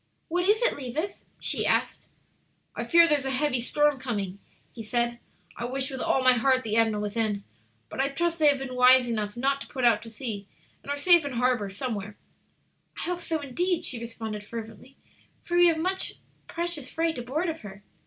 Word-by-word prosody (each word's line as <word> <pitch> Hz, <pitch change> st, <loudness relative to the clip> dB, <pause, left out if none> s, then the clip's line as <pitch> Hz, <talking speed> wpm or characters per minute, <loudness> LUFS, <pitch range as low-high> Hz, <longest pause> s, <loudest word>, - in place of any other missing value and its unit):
"What 355 Hz, +2 st, 0 dB
is 430 Hz, +4 st, +3 dB
it, -, -, +2 dB
Levis?" 285 Hz, +8 st, -5 dB
she -, -, 0 dB
asked. -, -, 0 dB, 0.7 s
"I -, -, -3 dB
fear 340 Hz, 0 st, +6 dB
there 300 Hz, -2 st, +3 dB
is 270 Hz, -, -7 dB
a -, -, -1 dB
heavy 265 Hz, -1 st, +1 dB
storm 295 Hz, +3 st, +2 dB
coming," 200 Hz, -7 st, -4 dB, 0.3 s
he 235 Hz, -, -8 dB
said. 235 Hz, +2 st, -1 dB, 0.4 s
"I 240 Hz, -, -4 dB
wish 265 Hz, +2 st, -3 dB
with 265 Hz, -, -5 dB
all 265 Hz, -, +1 dB
my 255 Hz, 0 st, +7 dB
heart 255 Hz, +2 st, +2 dB
the 215 Hz, -1 st, -2 dB
Edna 225 Hz, -2 st, +2 dB
was 210 Hz, +1 st, -4 dB
in. 215 Hz, -3 st, 0 dB, 0.4 s
But -, -, -9 dB
I 275 Hz, +1 st, +2 dB
trust 335 Hz, +4 st, -1 dB
they 305 Hz, -, +5 dB
have 285 Hz, -1 st, +5 dB
been 265 Hz, -1 st, -6 dB
wise 250 Hz, 0 st, +6 dB
enough 215 Hz, -2 st, -3 dB
not 275 Hz, +2 st, 0 dB
to -, -, -8 dB
put 260 Hz, -2 st, -2 dB
out 230 Hz, -3 st, +4 dB
to 230 Hz, -, -9 dB
sea 215 Hz, -3 st, -6 dB, 0.3 s
and -, -, -12 dB
are 285 Hz, -, -1 dB
safe 345 Hz, +2 st, +6 dB
in 285 Hz, -2 st, -4 dB
harbor 245 Hz, -4 st, +1 dB
some 230 Hz, +5 st, -3 dB
where." 205 Hz, 0 st, -6 dB, 0.8 s
"I -, -, -5 dB
hope 355 Hz, 0 st, -3 dB
so, 320 Hz, -2 st, -2 dB
indeed," 345 Hz, +6 st, -1 dB
she 245 Hz, -, 0 dB
responded, 225 Hz, -2 st, -6 dB
fervently, 225 Hz, +4 st, -9 dB, 0.5 s
"for 345 Hz, -, -3 dB
we 350 Hz, 0 st, +7 dB
have 330 Hz, -2 st, +3 dB
much 375 Hz, +4 st, 0 dB, 0.3 s
precious 340 Hz, -5 st, -3 dB
freight 325 Hz, -3 st, -1 dB
aboard 275 Hz, +9 st, -2 dB
of 325 Hz, -1 st, -3 dB
her. 200 Hz, -2 st, -11 dB
260 Hz, 210 wpm, -27 LUFS, 225-315 Hz, 0.8 s, my